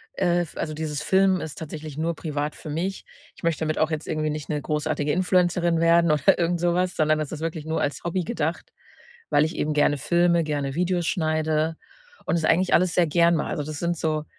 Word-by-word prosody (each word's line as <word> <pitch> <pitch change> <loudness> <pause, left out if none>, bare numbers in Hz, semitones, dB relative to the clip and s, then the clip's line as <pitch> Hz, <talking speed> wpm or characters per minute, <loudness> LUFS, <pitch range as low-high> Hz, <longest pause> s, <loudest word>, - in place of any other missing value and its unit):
äh, 175 -2 +2
f 165 - -7
also 155 - -3
dieses 150 -1 -3
Filmen 190 +2 +3
ist 155 - -7
tatsächlich 155 -2 -7
nur 165 +1 -1
privat 150 -2 -3
für 155 - -9
mich. 180 +6 -3 0.3
Ich - - -17
möchte 165 -1 0
damit 155 0 -1
auch 155 - +2
jetzt 155 -1 -4
irgendwie 155 -1 -1
nicht 150 0 -5
'ne 150 -1 -1
großartige 150 0 -1
Influencerin 175 -1 +2
werden 170 -1 +4
oder 150 -2 +4
irgend 170 0 0
sowas, 175 +1 +1
sondern 155 0 +2
das 150 - -4
ist 160 - -5
wirklich 160 -2 -4
nur 160 0 -1
als 145 - -2
Hobby 175 +1 -1
gedacht, 160 +1 -3 0.6
weil 145 - +4
ich 160 - -4
eben 150 0 -1
gerne 145 -1 +3
Filme, 170 +2 +2
gerne 145 -3 -2
Videos 175 0 0
schneide 155 -1 0 0.5
und 170 - +1
das 160 - -1
eigentlich 180 +3 +2
alles 180 -1 +2
sehr 175 -2 +3
gern 170 +2 +3
mache. 150 - -2
Also 150 - -2
das 155 0 -6
sind 170 -1 -1
so 155 -1 -1
160 Hz, 215 wpm, -24 LUFS, 155-170 Hz, 0.6 s, werden